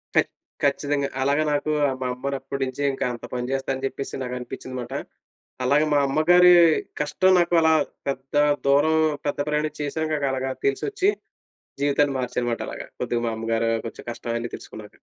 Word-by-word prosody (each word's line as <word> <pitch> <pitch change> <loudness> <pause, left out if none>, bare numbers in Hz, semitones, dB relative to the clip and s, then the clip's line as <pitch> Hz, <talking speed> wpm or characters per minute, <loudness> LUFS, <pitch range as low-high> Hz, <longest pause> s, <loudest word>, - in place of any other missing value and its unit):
ఖ - - +2 0.5
ఖచ్చితంగా. 140 0 +1
అలాగ 140 +2 +2
నాకు 145 +1 0 0.3
మా 130 - -1
అమ్మనప్పటినుంచి 135 0 -3
ఇంకా 135 - -2
అంత 120 - -8
పని 125 0 -3
చేస్తా 135 0 -2
అని 130 - -8
చెప్పేసి 135 - -6
నాకు 125 0 -4
అనిపించింది 125 +1 -7
మాట. 120 +2 -7 0.7
అలాగే 140 +4 +3
మా 145 - +4
అమ్మగారి 175 +5 +6 0.5
కష్టం 185 +5 +3
నాకు 175 0 +1
అలా 160 0 +5 0.3
పెద్ద 135 0 -4 0.3
దూరం, 145 +3 +4 0.3
పెద్ద 145 - -2
ప్రయాణం 150 +1 0
చేశాను 155 +2 -2
గాక. 145 -2 -1
అలాగ 130 0 -2
తెలిసొచ్చి, 390 - +1 0.7
జీవితాన్ని 145 0 +2
మార్చాననమాట 120 -1 -2
అలాగ. - - -6 0.2
కొద్దిగా 120 -1 -1
మా - - 0
అమ్మగారు, 115 0 0 0.2
కొంచెం - - -10
కష్టం 115 - -6
అన్నీ 115 0 -5
తెలుసుకున్నాక. 105 -1 -11
140 Hz, 155 wpm, -24 LUFS, 125-150 Hz, 0.7 s, అమ్మగారి